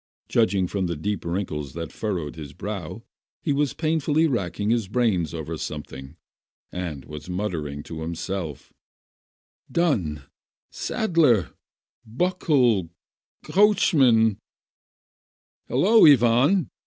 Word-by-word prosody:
Judging 100 -5 +2
from 95 0 -2
the 85 - -2
deep 95 +4 -3
wrinkles 85 -6 -3
that 85 -1 -6
furrowed 90 -9 -4
his 75 -4 -9
brow, 100 0 -6 0.4
he 155 -5 +1
was 145 -1 0
painfully 155 -1 +1
racking 105 - -1
his 115 -4 0
brains 100 -7 +1
over 80 0 -5
some 75 -1 -4
thing, 65 +3 -11 0.6
and 85 -7 -5
was 75 +2 -9
muttering 80 -7 -3
to 80 0 -8
himself: 85 -1 -5 0.5
" - - -34
Dunn 85 - 0 0.2
— - - -61
Sadler— 160 - +1 0.5
Buckle 125 - +1 0.3
— - - -56
Coachman 135 - +4 0.7
" - - -62
"Hello, 220 0 +6
Ivan 135 - +4
100 Hz, 115 wpm, -24 LUFS, 80-135 Hz, 0.7 s, Hello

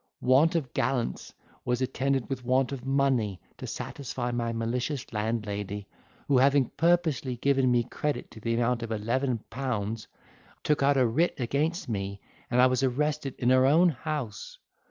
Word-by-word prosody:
Want 140 +7 +4
of 140 -7 -1
gallants 125 -4 -1 0.3
was 125 -1 0
attended 130 0 0
with 135 -2 -4
want 130 +1 +2
of 135 -3 -5
money 130 -8 +1 0.2
to - - -6
satisfy 125 -3 -4
my 120 -1 -1
malicious 120 +4 -2
landlady, 105 -2 -3 0.4
who 135 -3 +4
having 135 -1 +4
purposely 160 -7 +1
given 135 +1 +2
me 120 -1 +3
credit 145 +4 -3
to 110 - -11
the 115 +1 -1
amount 120 0 +1
of 115 -1 -5
eleven 115 +2 -1
pounds, 115 -5 -3 0.6
took 150 -1 +1
out 140 0 +4
a 130 - +4
writ 145 +10 +1
against 150 +8 -1
me 100 -3 -3 0.3
and 125 - +1
I 125 - +8
was 130 -1 +2
arrested 140 +1 0
in 125 0 +2
her 130 0 +5
own 165 +6 +5
house. 135 -7 -5
125 Hz, 160 wpm, -28 LUFS, 115-140 Hz, 0.6 s, I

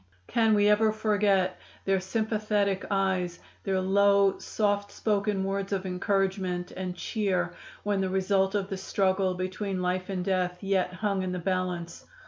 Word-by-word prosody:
Can 225 - +3
we 205 0 +4
ever 215 +1 +4
forget 205 -4 +1 0.3
their 195 0 +2
sympathetic 210 -1 0
eyes, 190 -3 0 0.3
their 190 -1 0
low, 200 +1 +3
soft 205 -1 -1
spoken 205 -2 0
words 195 0 -2
of 195 -1 -1
encouragement 185 -1 -1
and 185 -1 -5
cheer 195 -2 -1 0.3
when 205 -1 0
the 190 - 0
result 190 +1 +1
of 200 -2 0
the 195 - -2
struggle 190 -1 +1
between 185 +1 -3
life 180 +1 -1
and 185 -2 -2
death 180 -2 0
yet 195 -2 +1
hung 200 0 -1
in 185 -1 -2
the - - -2
balance? 180 -1 -2
195 Hz, 150 wpm, -28 LUFS, 185-205 Hz, 0.3 s, we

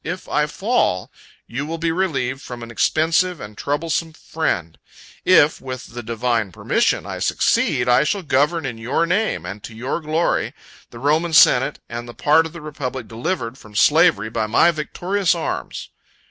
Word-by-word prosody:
If 180 +4 -5
I 150 0 +1
fall, 190 - 0 0.3
you 135 +5 -4
will 165 +1 -4
be 165 0 0
relieved 135 -8 -1
from 120 -1 -8
an 115 - -9
expensive 165 +7 +1
and 105 -2 -9
troublesome 160 +5 -2
friend: 85 - -3 0.5
if, 155 -4 +5
with 130 -2 -7
the 120 - -5
divine 115 -2 -1
permission, - - 0
I - - -5
succeed, 120 0 +1
I 125 +3 +5
shall 195 +5 -1
govern 150 +2 +1
in 115 -4 -5
your 130 +9 0
name, 180 - 0
and 100 +3 -7
to 110 - -10
your 130 +8 -3
glory, 155 +2 0 0.3
the - - -12
Roman 155 +6 +1
senate, 140 -3 +5
and 120 0 -6
the 120 - -10
part 160 +2 +3
of - - -13
the 170 - -9
republic 135 -5 -5
delivered 120 - -4
from 105 -1 -15
slavery 150 - +4
by 110 -1 -1
my 120 +10 +4
victorious 175 +4 -1
arms." 165 - -4
145 Hz, 170 wpm, -21 LUFS, 120-165 Hz, 0.5 s, if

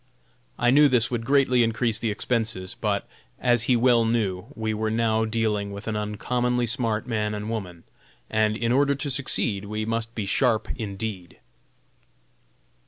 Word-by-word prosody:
I 120 0 +3
knew 145 +2 +6
this 125 -2 +2
would 115 -1 -3
greatly 135 -3 +4
increase 115 -1 +1
the 115 - -1
expenses, 110 -3 -2
but, - - -2 0.3
as 120 -2 +3
he 125 - +5
well 120 -1 +4
knew, 110 -4 -1
we 110 -1 -2
were 110 0 -1
now 110 0 +1
dealing 110 -2 -1
with 100 +2 -8
an 110 - -2
uncommonly 120 +4 -1
smart 115 -2 -1
man 105 -3 -1
and 105 +1 -4
woman, 90 -7 -5 0.4
and 110 0 +1
in 115 0 0
order 140 +2 +3
to 140 +1 -3
succeed, 115 -7 -1
we 105 +1 -3
must 115 +1 -3
be 105 - -2
sharp 110 +2 +1
indeed! 100 -4 -6
115 Hz, 160 wpm, -25 LUFS, 105-120 Hz, 0.4 s, knew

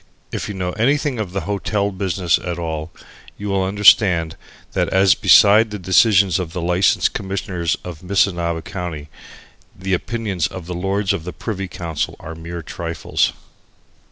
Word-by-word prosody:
If - - -4
you 105 - -5
know 90 -1 -2
anything 135 - 0
of 100 -5 -3
the 100 +1 -2
hotel 100 +2 -1
business 95 -3 0
at 90 -1 -4
all, 80 -1 -4 0.5
you 100 0 -5
will 100 -1 +1
understand 95 -4 +4 0.4
that - - 0
as 95 0 +5
beside 105 +5 +6
the 105 - -5
decisions 95 0 +4
of 85 -2 -5
the 90 - -3
License 90 +2 +2
Commissioners 95 -4 -3
of 85 -4 -8
Missinaba 85 -3 0
County, 85 -5 -6 0.7
the 95 +1 -2
opinions 100 -2 -1
of 90 -3 -9
the 90 - -5
Lords 95 +2 0
of 90 -5 -4
the 90 - -5
Privy 95 -4 -4
Council 85 -4 -4
are 80 - -8
mere 85 +1 -7
trifles. 85 +2 -1
95 Hz, 155 wpm, -20 LUFS, 85-100 Hz, 0.7 s, beside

